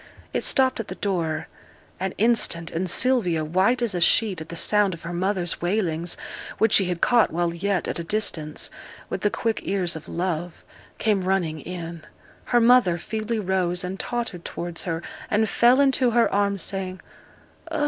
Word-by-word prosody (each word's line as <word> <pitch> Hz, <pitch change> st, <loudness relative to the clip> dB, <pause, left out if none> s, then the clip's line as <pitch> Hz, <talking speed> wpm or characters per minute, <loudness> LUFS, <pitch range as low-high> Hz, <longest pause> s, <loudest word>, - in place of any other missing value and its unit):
It -, -, -1 dB
stopped 260 Hz, -2 st, +3 dB
at 225 Hz, -, -4 dB
the -, -, -6 dB
door 165 Hz, -6 st, -2 dB, 0.5 s
an 190 Hz, 0 st, -3 dB
instant, 210 Hz, -7 st, +2 dB
and 180 Hz, +2 st, -1 dB
Sylvia, 180 Hz, -9 st, +2 dB
white 190 Hz, +10 st, +2 dB
as 230 Hz, -4 st, +1 dB
a 175 Hz, -, -2 dB
sheet 190 Hz, -1 st, +3 dB
at 160 Hz, -, -9 dB
the 170 Hz, -, -6 dB
sound 205 Hz, +1 st, +2 dB
of 165 Hz, -, -16 dB
her 170 Hz, +1 st, -5 dB
mother's 180 Hz, -1 st, -1 dB
wailings, 175 Hz, -3 st, -1 dB, 0.4 s
which 220 Hz, -1 st, +3 dB
she 195 Hz, -, +6 dB
had 175 Hz, -1 st, -3 dB
caught 240 Hz, -2 st, +4 dB
while 170 Hz, 0 st, 0 dB
yet 190 Hz, +2 st, -1 dB
at -, -, -2 dB
a -, -, -3 dB
distance, 165 Hz, -5 st, -1 dB, 0.4 s
with -, -, -3 dB
the 205 Hz, -, +2 dB
quick 225 Hz, +1 st, -1 dB
ears 185 Hz, -4 st, -1 dB
of 160 Hz, -, -9 dB
love, 175 Hz, -1 st, -3 dB, 0.3 s
came 205 Hz, -4 st, +1 dB
running 175 Hz, -5 st, 0 dB
in; 170 Hz, 0 st, -7 dB, 0.4 s
her 240 Hz, -, +3 dB
mother 235 Hz, -7 st, +5 dB
feebly 220 Hz, +5 st, -3 dB
rose 185 Hz, -2 st, 0 dB
and 185 Hz, +2 st, -5 dB
tottered 230 Hz, -8 st, -4 dB
towards 175 Hz, -1 st, -4 dB
her, 165 Hz, -1 st, -3 dB, 0.3 s
and 215 Hz, +1 st, +2 dB
fell 240 Hz, +5 st, +4 dB
into 265 Hz, -2 st, +4 dB
her 235 Hz, 0 st, +3 dB
arms, 200 Hz, -2 st, +1 dB
saying, 190 Hz, -1 st, -4 dB, 0.7 s
'Oh! 320 Hz, -, -2 dB
185 Hz, 180 wpm, -24 LUFS, 170-220 Hz, 0.7 s, she